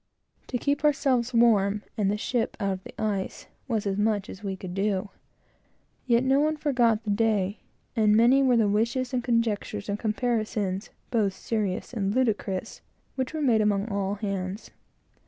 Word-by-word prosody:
To 250 - -2
keep 285 +4 -1
ourselves 270 -5 +2
warm, 210 -4 +3
and 205 -3 +1
the 205 - 0
ship 235 +2 -1
out 200 -2 0
of 190 0 -5
the - - -12
ice, 200 -3 -2 0.2
was 225 -5 -1
as 195 -1 -1
much 210 -2 0
as 195 - -10
we 195 -1 -3
could 185 -1 -7
do. 195 0 -1 1.0
Yet 240 0 +4
no 265 +1 +3
one 310 +1 +1
forgot 240 -7 +2
the 210 - -1
day; 205 -2 +1 0.4
and 215 -2 +4
many 245 +4 +5
were 255 -3 +4
the 220 -2 +3
wishes, 235 +5 0
and 245 -1 0
conjectures, 220 -3 -1
and 200 +1 -2
comparisons, 215 -3 -1 0.2
both 210 -5 +1
serious 210 -1 -2
and 200 -2 -1
ludicrous, 220 -5 -1 0.3
which 260 +3 -3
were 310 - -1
made 230 -5 +4
among 210 0 +1
all 200 -1 -1
hands. 195 -1 -4
215 Hz, 170 wpm, -27 LUFS, 200-245 Hz, 1.0 s, many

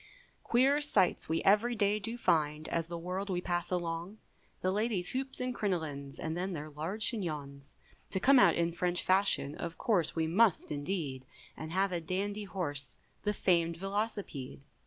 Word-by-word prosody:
Queer 270 +5 +3
sights 290 - +2
we 160 - 0
every 215 +5 +4
day 210 -1 +2
do 225 +4 -5
find, 155 -6 +1
As 165 -1 -1
the 170 0 -5
world 185 +4 -4
we 180 -2 0
pass 175 -1 -2
along, 175 +2 -3 0.4
The 185 - +1
ladies 205 -3 0
hoops 265 +1 -3
and 250 0 -1
crinolines, 155 -10 -3
And 160 0 -3
then 185 +2 -2
their 155 -1 -6
large 170 +9 -2
chignons; 145 - -5 0.3
To 190 - -1
come 270 +6 +6
out 190 -4 +6
in 170 0 +1
French 175 +1 -1
fashion, 185 -7 +2
Of 170 +1 -6
course 185 -9 +1
we 160 -1 +1
must 190 +4 +3
indeed, 145 -4 -3 0.3
And 155 0 -7
have 190 +2 +1
a 175 -1 -1
dandy 200 +5 -2
horse, 145 -9 -2 0.3
The 210 - +2
famed 170 -3 +2
Velocipede. 195 - -4
180 Hz, 170 wpm, -32 LUFS, 160-205 Hz, 0.4 s, come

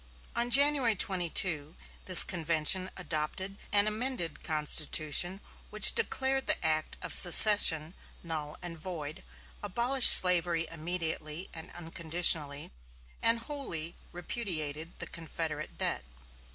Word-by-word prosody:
On 240 +1 -1
January 275 -3 +1
22 175 -4 -1 0.3
this 185 -2 +9
convention 170 +1 -1
adopted 180 +3 -6
an 205 0 +2
amended 215 -4 -5
constitution 155 +3 -1 0.3
which - - +6
declared 270 - -2
the - - -3
act 155 -1 -3
of - - -8
secession 175 -3 +6 0.3
null 155 -3 -8
and 170 -2 -9
void, 155 -3 -9 0.4
abolished 240 +6 +2
slavery 175 -2 +4
immediately 165 0 -6
and 160 -1 -12
unconditionally, 160 -3 0 0.5
and 230 0 0
wholly 200 - -6 0.2
repudiated 165 -5 -7
the - - -6
Confederate 160 -2 -8
debt. - - -3
170 Hz, 105 wpm, -27 LUFS, 155-205 Hz, 0.5 s, this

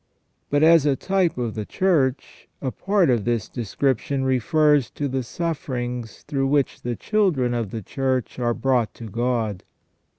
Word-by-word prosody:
But, 145 +1 +2
as 160 -2 +6
a 140 - +3
type 190 0 0
of 120 -3 -2
the 110 - -4
Church, 140 - 0
a 130 - -2
part 195 -4 +2
of 115 -4 +1
this 120 -2 -1
description 130 +3 -1
refers 145 +1 +3
to 145 - -3
the 130 0 -1
suffer 150 +1 -3
ings 120 -2 -5
through 135 -2 -1
which 140 -1 +1
the 120 -1 -3
children 165 - +1
of 115 -4 -2
the 110 +1 -6
Church 130 +2 -2
are 120 -1 +1
brought 125 -4 +1
to 115 - -8
God. 115 -3 -1
130 Hz, 165 wpm, -23 LUFS, 120-145 Hz, -, as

